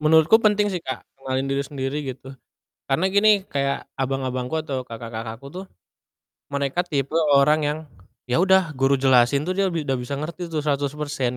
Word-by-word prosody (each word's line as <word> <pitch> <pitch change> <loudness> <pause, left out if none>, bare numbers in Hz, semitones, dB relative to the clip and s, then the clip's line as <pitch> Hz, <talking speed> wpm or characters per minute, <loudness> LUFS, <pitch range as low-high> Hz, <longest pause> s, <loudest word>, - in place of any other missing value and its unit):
Menurutku 160 +7 +5
penting 210 -1 +3
sih 180 - -2
Kak 130 -5 -6
ngenalin 135 0 -2
diri 140 0 0
sendiri 135 0 -4 0.2
gitu. 135 +1 -12 0.5
Karena 135 +7 +1
gini, 200 +3 +4 0.2
kayak 140 -3 -2
abang-abangku 130 -1 -2
atau 135 -4 -4
kakak-kakakku 115 +1 -7
tuh, 185 +6 -8 0.8
mereka 140 +3 -1
tipe 140 -3 -2 0.2
orang 150 +3 +4
yang, 150 +1 -2 0.5
ya 125 +6 +1
udah, 190 -3 +4
guru 135 0 +2
jelasin 130 +1 +4
tuh 180 - -1
dia 195 +1 +1
bi 165 -4 -2
udah 135 -2 -1
bisa 125 +3 -4
ngerti 170 +4 -5
tuh 155 -3 -3
100% 140 -3 -1
140 Hz, 165 wpm, -23 LUFS, 130-160 Hz, 0.8 s, Menurutku